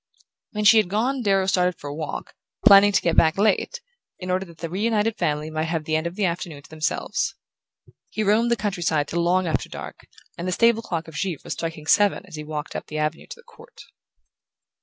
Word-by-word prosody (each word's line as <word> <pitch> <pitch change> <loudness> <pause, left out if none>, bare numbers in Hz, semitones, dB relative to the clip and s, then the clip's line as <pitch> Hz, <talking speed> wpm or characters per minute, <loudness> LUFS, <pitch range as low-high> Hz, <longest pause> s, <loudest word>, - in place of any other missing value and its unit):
When 210 0 -2
she 215 +2 +7
had 210 -5 +3
gone 245 +7 0
Darrow 195 -3 +2
started 180 -2 +1
for 145 - -8
a 145 - -5
walk, 155 0 -6 0.3
planning 205 -1 +8
to - - +2
get 170 - +1
back 160 +2 +4
late, 215 - +1 0.4
in 180 0 -5
order 185 +1 0
that 170 -2 -15
the 170 - -5
reunited 210 +4 0
family 150 -4 -1
might 155 0 -1
have 165 -1 -2
the 155 +1 -1
end 160 +2 0
of 170 - -7
the 205 -1 0
afternoon 170 -4 -4
to - - -17
themselves. 195 +10 -2 0.7
He 215 - -2
roamed 215 +4 +3
the 235 - +3
country 200 -4 -3
side 155 -3 +1
till 170 +3 -1
long 180 +2 +2
after 160 - -1
dark, - - -8 0.4
and 175 - -3
the - - 0
stable 230 +2 +3
clock 170 -7 -4
of 160 - -11
Givre 170 0 -2
was - - -4
striking 165 -2 -5
seven 205 +3 +3
as 185 -4 -11
he 150 - -6
walked 150 0 -6
up - - -5
the 155 - -6
avenue 155 +1 -2
to - - -8
the 480 - -19
court. 475 +2 -18
180 Hz, 225 wpm, -23 LUFS, 160-210 Hz, 0.7 s, planning